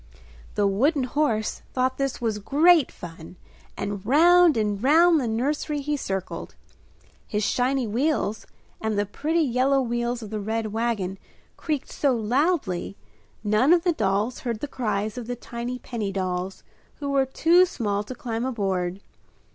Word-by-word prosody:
The 205 - +2
wooden 260 +9 +2
horse 250 -5 0
thought 260 +1 0
this 275 -1 -1
was 220 -3 -1
great 305 - +4
fun 165 0 -10 0.4
and 200 -1 -4
round 335 +5 +5
and 210 -2 0
round 320 +4 +5
the 245 - -2
nursery 290 +6 -1
he 295 +1 -1
circled. 195 -8 -4 0.7
His 210 -1 -1
shiny 255 +3 +1
wheels 225 -2 -1 0.3
and 220 -1 -1
the 205 - +1
pretty 315 - -1
yellow 265 +1 +2
wheels 240 -1 -1
of 215 - -9
the 215 - -2
red 220 +1 -2
wagon 215 -5 -1 0.4
creaked 300 -4 -3
so 275 -3 +1
loudly 230 - 0 0.5
none 215 +9 +4
of 345 -1 +3
the 350 -2 +2
dolls 210 0 0
heard 235 -4 -3
the 290 - -2
cries 215 -4 -2
of 235 - -8
the 245 - -3
tiny 240 +1 -5
penny 225 -5 -4
dolls 185 -1 -3 0.3
who 285 -1 -4
were 270 -1 +2
too 335 +7 +4
small 205 - -2
to 255 - -7
climb 235 -5 -3
aboard. 195 -6 -2
240 Hz, 155 wpm, -25 LUFS, 205-280 Hz, 0.7 s, round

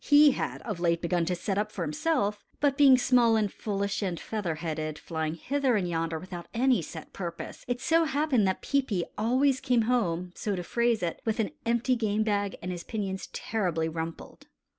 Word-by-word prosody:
He 295 0 +7
had - - -3
of 210 -6 -4
late 170 -1 +2
begun 170 0 0
to 180 +1 0
set 195 +3 -1
up 210 0 -1
for 185 - -3
himself, 205 - 0 0.2
but 285 -2 +2
being 275 -2 +7
small 245 -2 +4
and 210 -3 +1
foolish 200 -1 -2
and 185 -4 -2
feather 200 -7 -3
headed, 155 -1 -3
flying 160 -1 -3
hither 265 - 0
and 190 -4 0
yonder 165 -1 -1
without 175 +1 -8
any 250 -3 +3
set 160 0 -9
purpose, 170 -3 -6
it 245 0 -1
so 330 +5 +3
happened 280 -7 +2
that 190 - -1
Peepi 250 -10 +1
always 260 +5 +2
came 250 -4 +2
home, 180 -7 0
so 205 +1 -2
to 180 - -4
phrase 235 +1 +1
it, 170 - -2
with 225 0 -1
an 220 - 0 0.2
empty 235 +2 +2
game 215 -2 +1
bag 205 -2 0
and 180 - -3
his 175 -1 -5
pinions 195 -4 -4
terribly 175 -7 -1
rumpled. 160 0 -6
205 Hz, 195 wpm, -28 LUFS, 175-245 Hz, 0.2 s, He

